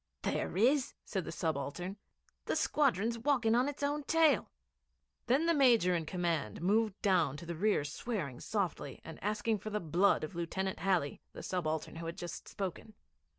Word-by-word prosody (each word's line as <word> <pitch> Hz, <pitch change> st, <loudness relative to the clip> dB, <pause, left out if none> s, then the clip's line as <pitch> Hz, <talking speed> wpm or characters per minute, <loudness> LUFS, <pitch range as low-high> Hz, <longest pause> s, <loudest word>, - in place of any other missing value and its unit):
'There 175 Hz, -, -1 dB
is,' 260 Hz, +6 st, +3 dB
said 190 Hz, -4 st, -2 dB
the -, -, -5 dB
subaltern. 165 Hz, +3 st, -3 dB, 0.5 s
'The -, -, 0 dB
squadron's 235 Hz, -5 st, +2 dB
walking 240 Hz, -3 st, +2 dB
on 250 Hz, +4 st, +3 dB
it's 290 Hz, 0 st, -6 dB
own 290 Hz, +1 st, 0 dB
tail.' 320 Hz, -1 st, +4 dB, 0.8 s
Then 270 Hz, +7 st, +3 dB
the 335 Hz, -, +4 dB
Major 235 Hz, -, +5 dB
in 165 Hz, -3 st, -1 dB
command 165 Hz, -, -1 dB
moved 210 Hz, +3 st, +1 dB
down 175 Hz, -9 st, +3 dB
to 170 Hz, -, -9 dB
the 170 Hz, -, -4 dB
rear 195 Hz, -1 st, +2 dB
swearing 150 Hz, -, -4 dB
softly 185 Hz, -9 st, -2 dB
and 160 Hz, -, -9 dB
asking 210 Hz, +1 st, 0 dB
for 215 Hz, -, -6 dB
the 210 Hz, 0 st, -1 dB
blood 175 Hz, +3 st, +3 dB
of 155 Hz, -, -5 dB
Lieutenant 185 Hz, +3 st, -2 dB
Halley 180 Hz, -7 st, 0 dB
the -, -, -8 dB
subaltern 160 Hz, -3 st, -2 dB
who 165 Hz, 0 st, -5 dB
had 165 Hz, -, -5 dB
just 175 Hz, -, -6 dB
spoken. 200 Hz, +2 st, -5 dB
190 Hz, 170 wpm, -33 LUFS, 165-230 Hz, 0.8 s, Major